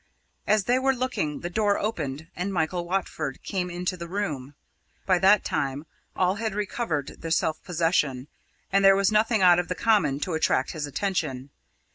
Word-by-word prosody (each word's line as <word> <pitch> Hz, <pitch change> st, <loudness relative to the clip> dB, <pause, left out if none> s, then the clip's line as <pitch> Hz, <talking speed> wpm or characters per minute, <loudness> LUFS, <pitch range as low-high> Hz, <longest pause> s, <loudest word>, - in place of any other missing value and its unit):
As 210 Hz, -1 st, +3 dB
they 245 Hz, +5 st, +2 dB
were 270 Hz, 0 st, +2 dB
looking, 245 Hz, -, -2 dB
the 175 Hz, -, -4 dB
door 205 Hz, 0 st, +2 dB
opened 160 Hz, -9 st, -3 dB
and 180 Hz, +3 st, -3 dB
Michael 175 Hz, 0 st, -1 dB
Watford 165 Hz, -6 st, -3 dB
came 180 Hz, -2 st, -2 dB
into 180 Hz, +1 st, -3 dB
the 170 Hz, -1 st, -7 dB
room. 150 Hz, -8 st, -4 dB, 0.5 s
By 185 Hz, -2 st, +3 dB
that 195 Hz, +2 st, +5 dB
time 140 Hz, +2 st, -2 dB, 0.3 s
all 185 Hz, +1 st, +1 dB
had 220 Hz, -2 st, -3 dB
recovered 205 Hz, -, -3 dB
their 165 Hz, -, -5 dB
self 160 Hz, -1 st, 0 dB
possession, 160 Hz, -6 st, 0 dB, 0.4 s
and 195 Hz, +1 st, +3 dB
there 195 Hz, 0 st, +7 dB
was 195 Hz, +1 st, +2 dB
nothing 215 Hz, -1 st, +2 dB
out 175 Hz, -1 st, +7 dB
of 175 Hz, -, -2 dB
the 180 Hz, -, -3 dB
common 170 Hz, -13 st, +2 dB
to 180 Hz, -, -2 dB
attract 160 Hz, -4 st, +1 dB
his 155 Hz, -3 st, -4 dB
attention. 145 Hz, -5 st, -2 dB
180 Hz, 175 wpm, -26 LUFS, 155-200 Hz, 0.5 s, there